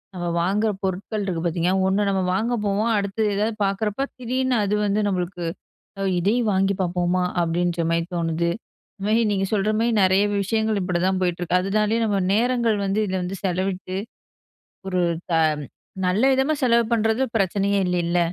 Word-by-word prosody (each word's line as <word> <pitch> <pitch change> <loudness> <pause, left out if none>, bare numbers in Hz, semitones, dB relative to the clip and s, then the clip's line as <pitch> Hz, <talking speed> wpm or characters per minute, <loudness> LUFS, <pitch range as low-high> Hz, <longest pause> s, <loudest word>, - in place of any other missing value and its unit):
நம்ம 175 -1 -3
வாங்குற 205 +5 +1
பொருட்கள் 200 +3 -2
இருக்கு 170 -4 -2
பாத்தீங்கன்னா, 175 +3 +1
ஒண்ணு 200 +1 +1
நம்ம 190 -1 +1
வாங்க 225 +5 0
போவோம். 210 +3 +1
அடுத்து 200 +2 -2
எதாவது 215 +2 0
பாக்குறப்போ, 210 +5 -1
திடீர்னு 255 +1 -1
அது 205 +1 0
வந்து 205 +1 +1
நம்பளுக்கு, 180 -2 -2 0.5
அ - - -3 0.2
"இதையும் 215 +5 +1
வாங்கி 195 +1 +2
பாப்போமா?" 180 0 0 0.2
அப்படின்ற 170 +1 0
மாரி 165 0 +1
தோணுது. 170 0 0 0.5
இது 195 - -4
மாரி 225 +2 +3
நீங்க 195 -1 0
சொல்ற 210 +1 +1
மாரி 235 +1 +2
நெறைய 190 +2 +4 0.2
விஷயங்கள், 220 0 0
இப்படி 180 -1 -1
தான் 190 0 +1
போயிட்டு 175 0 -1
இருக்கு. 180 +1 +2
அதுனாலேயே 210 +3 +1
நம்ம 200 -2 +1
நேரங்கள் 235 -1 +2
வந்து 195 +2 0
இதில 185 -1 -2
வந்து 185 +2 -4
செலவிட்டு, 185 0 -2 0.9
ஒரு 185 -1 0 0.3
த - - +1 0.7
நல்ல 200 +7 +1
விதமா 265 +4 +2
செலவு 235 -1 +4
பண்ணுறது 225 +3 +1
பிரச்சனையே 200 +1 +1
இல்லைல்ல! 175 0 +1
195 Hz, 160 wpm, -23 LUFS, 180-215 Hz, 0.9 s, நெறைய